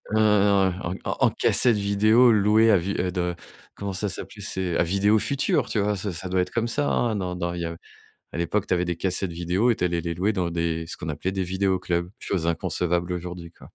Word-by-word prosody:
heu, - - +3
en 100 -3 +3 0.2
en - - -1
en - - +5
cassette 120 -4 +2
vidéo 110 +4 +4
louée 110 +2 +4
à 100 - +6
vue 95 +4 -2
de 90 -1 -1 0.4
comment 100 -1 -5
ça 100 +2 -2
s'appelait? - - -7
C'est 90 -3 -2
à - - +3
Vidéo 100 +5 +2
Futur, 140 +4 +1
tu 110 - 0
vois? 105 +1 +1
Ce 100 0 -3
ça 95 +3 -6
doit 90 0 +2
être 90 - -3
comme 115 0 -1
ça, 145 +5 -1
hein. 115 -3 +1
Dans 90 -2 -3
dans 85 -1 -3
il 85 - -4
y - - -2
a, 85 0 -5 0.6
à - - -6
l'époque, 90 +4 -1
tu - - +1
avais 90 0 +1
des 85 -1 -2
cassettes 95 0 -2
vidéo 90 +7 0
et - - +1
tu - - -4
allais 85 -1 0
les 85 0 -3
louer 100 +5 0
dans 90 -3 -1
des 85 -1 -2
ce - - -6
qu'on 80 - -6
appelait 75 +6 -3
des 95 -1 -2
vidéos 95 +1 0
clubs, 85 0 -2
chose 85 -4 -2
inconcevable 85 +1 -1
aujourd'hui, 90 -1 -6
quoi. - - -16
95 Hz, 240 wpm, -24 LUFS, 85-100 Hz, 0.6 s, à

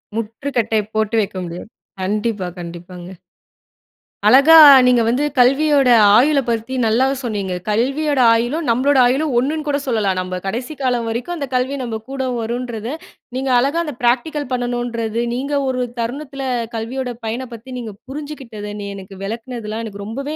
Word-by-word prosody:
முற்றுக்கட்டை 225 0 -1
போட்டு 220 +1 0
வைக்க 200 -2 -4
முடியாது. 175 +4 -8 0.3
கண்டிப்பா, 205 0 -1
கண்டிப்பாங்க. 175 +1 -9 1.2
அழகா, 280 +5 +7 0.3
நீங்க 250 -1 +4
வந்து 250 +5 +1 0.2
கல்வியோட 275 +1 +4 0.3
ஆயுள 285 +3 +4
பத்தி 230 +2 -2
நல்லா 225 +4 +3 0.2
சொன்னீங்க. 205 -6 -3
கல்வியோட 270 +7 0
ஆயுளும், 240 +8 0
நம்மளோட 265 +4 +3
ஆயுளும் 275 +3 0
ஒண்ணுனு 300 +5 -2
கூட 285 -1 +1
சொல்லலாம். 215 -7 0
நம்ம 185 0 -4
கடைசி 245 +9 -4
காலம் 250 -3 0
வரைக்கும் 245 +10 -3
அந்த 285 -4 -4
கல்வி 255 +2 0
நம்ம 230 -3 -4
கூட 270 -1 -3 0.2
வருன்றத, 235 -1 -4 0.5
நீங்க 265 +1 -2
அழகா 280 +6 +1
அந்த 300 - -5
பிராக்டிகல் 265 +4 0
பண்ணணுன்றது, 240 -2 -2
நீங்க 275 +4 -3
ஒரு 255 -1 -1 0.2
தருணத்துல 275 +4 -4 0.3
கல்வியோட 245 +3 -3
பயன 235 +4 -3
பத்தி 230 +3 -11
நீங்க 230 -4 -6
புரிஞ்சுக்கிட்டது. 265 -7 -7
நீ 200 - -5
எனக்கு 195 0 -10
விளக்குனதுலாம் 225 +1 -5
எனக்கு 200 -2 -8
ரொம்பவே, 275 +8 -5
240 Hz, 140 wpm, -19 LUFS, 220-270 Hz, 1.2 s, அழகா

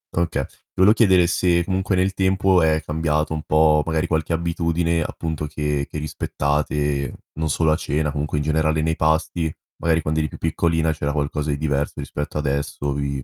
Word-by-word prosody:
Okay. 85 0 0 0.3
Volevo 100 +4 +6
chiedere 95 -7 +4
se 85 0 +2
comunque 95 0 0
nel 95 +1 +1
tempo 95 -1 +3
è 80 0 +2
cambiato 75 0 0
un 80 - -3
po' 75 0 +4
magari 80 0 0
qualche 80 0 -1
abitudine, 85 0 0
appunto, 80 0 -3
che 75 -1 -2
che - - -6
rispettate, 75 -1 -1 0.2
non 80 0 -2
solo 80 +1 +2
a - - +4
cena 75 0 -1
comunque 75 +1 -2
in 75 - 0
generale 80 0 +1
nei 80 0 +1
pasti, 80 +1 0 0.3
magari 80 -1 +1
quando 80 +1 0
eri 75 -1 -1
più - - -10
piccolina 80 0 +1
c'era 75 -1 -2
qualcosa 75 0 -2
di 70 - 0
diverso 75 -1 -1
rispetto 75 +2 -4
adesso. 70 0 -2
Vi 70 -2 -3
80 Hz, 175 wpm, -22 LUFS, 75-85 Hz, 0.3 s, Volevo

